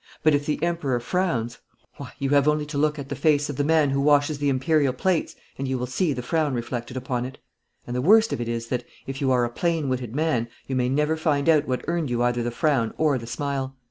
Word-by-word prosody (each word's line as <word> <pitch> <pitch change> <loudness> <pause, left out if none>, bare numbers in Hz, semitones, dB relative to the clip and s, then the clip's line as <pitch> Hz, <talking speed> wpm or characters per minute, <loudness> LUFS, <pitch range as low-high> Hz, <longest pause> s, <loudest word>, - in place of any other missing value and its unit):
But 155 -1 +5
if 145 0 0
the 150 - 0
Emperor 165 -8 0
frowns, 125 -6 -1 0.4
why, 140 -3 -8
you 140 -1 -2
have 140 0 +4
only 150 0 +2
to 150 -1 -5
look 150 +1 +1
at 140 -1 -7
the 145 - -3
face 145 +1 +2
of - - -7
the 145 - +1
man 155 -2 +3
who 140 0 +1
washes 145 0 +3
the 145 -1 +1
Imperial 135 +1 +2
plates, 175 +6 0 0.2
and 135 - -2
you 130 0 -1
will 125 - -2
see 150 +7 0
the 125 -3 -3
frown 150 0 0
reflected 120 +1 -4
upon 125 -1 -2
it. 130 +2 -7 0.5
And 120 - -5
the 125 - 0
worst 220 - +5
of - - -3
it 120 - -3
is 115 0 -3
that, 125 -1 -1 0.2
if 135 +1 -6
you 135 -2 +2
are 125 -1 +3
a - - -3
plain 165 0 -1
witted 125 -2 -3
man, 150 -7 +1 0.2
you 130 - -3
may 125 -1 +1
never 150 +4 +1
find 150 -2 0
out 155 -2 +4
what 130 -1 -2
earned 170 -4 -1
you 120 0 0
either 120 0 +1
the 120 - -1
frown 120 -3 0
or 150 -4 +2
the 115 - -9
smile. 135 +1 -3
140 Hz, 255 wpm, -24 LUFS, 125-150 Hz, 0.5 s, But